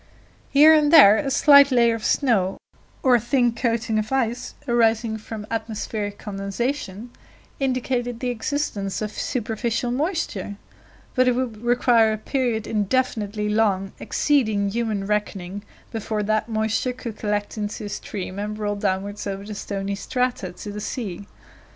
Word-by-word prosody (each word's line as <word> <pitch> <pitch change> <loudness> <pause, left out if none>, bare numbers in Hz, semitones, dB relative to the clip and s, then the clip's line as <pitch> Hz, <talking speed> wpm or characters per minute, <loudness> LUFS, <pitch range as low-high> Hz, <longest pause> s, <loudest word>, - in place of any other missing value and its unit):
Here 300 +3 +7
and 300 -1 +4
there 220 -11 +9
a 275 - -1
slight 280 0 +7
layer 235 -2 +4
of 225 -1 -5
snow, 210 -11 +1 0.5
or 260 - +5
a 240 - +6
thin 240 +1 +2
coating 230 -2 0
of 215 +3 -4
ice 245 -2 -1
arising 225 -2 +2
from 215 0 -7
atmospheric 220 -2 -3
condensation 205 +2 -4 0.5
indicated 250 -2 -1
the 250 -1 -1
existence 220 -5 -2
of 210 - -3
superficial 230 +1 -2
moisture, 280 - -2 0.6
but 255 -1 +3
it 250 - +4
would 240 -4 -3
require 240 -2 +3
a - - -2
period 235 -2 -1
indefinitely 210 -1 -1
long, 205 -3 +1
exceeding 220 -9 +1
human 220 -3 -1
reckoning, 205 -2 -2 0.3
before 220 -1 -2
that 215 +2 0
moisture 220 +3 0
could 240 -3 -7
collect 205 -1 -2
into 210 0 -4
a - - -5
stream 195 -1 -5
and 210 +1 -4
roll 205 -1 -2
downwards 200 +1 -2
over 195 0 -4
the 210 - -6
stony 200 -1 -4
strata 245 -1 -2
to 205 +3 -8
the 210 +1 -6
sea. 200 -5 -5
220 Hz, 145 wpm, -23 LUFS, 205-245 Hz, 0.6 s, there